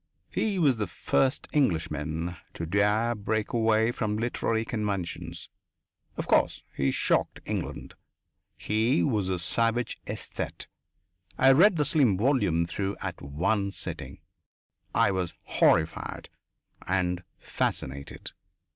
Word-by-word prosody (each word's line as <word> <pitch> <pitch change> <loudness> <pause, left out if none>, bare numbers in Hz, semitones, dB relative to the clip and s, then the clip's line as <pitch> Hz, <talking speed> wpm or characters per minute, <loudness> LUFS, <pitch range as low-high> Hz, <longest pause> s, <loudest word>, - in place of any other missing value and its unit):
He 210 -3 0
was 145 -8 +3
the 105 -2 -1
first 130 - 0
Englishman 80 - 0 0.2
to 85 - -3
dare 105 +6 +2
break 110 0 -2
away 110 0 +3
from 110 -3 -2
literary 115 -1 0
conventions. 100 -7 -3 0.7
Of - - -2
course - - +2
he 70 - +1
shocked - - +1
England. - - -4 0.6
He 110 +6 +2
was 105 -8 +1
a 95 - 0
savage 115 +6 0
aesthete. - - -5 0.7
I 135 - +6
read 170 +7 +6
the 150 - +2
slim 135 -10 +3
volume 100 - +2
through 100 +3 -3
at - - -5
one 100 +9 0
sitting; - - -6 0.7
I - - +4
was 90 -2 -2
horrified - - +1 0.6
and 90 -1 0
fascinated. 70 +1 -3
105 Hz, 115 wpm, -28 LUFS, 90-120 Hz, 0.7 s, I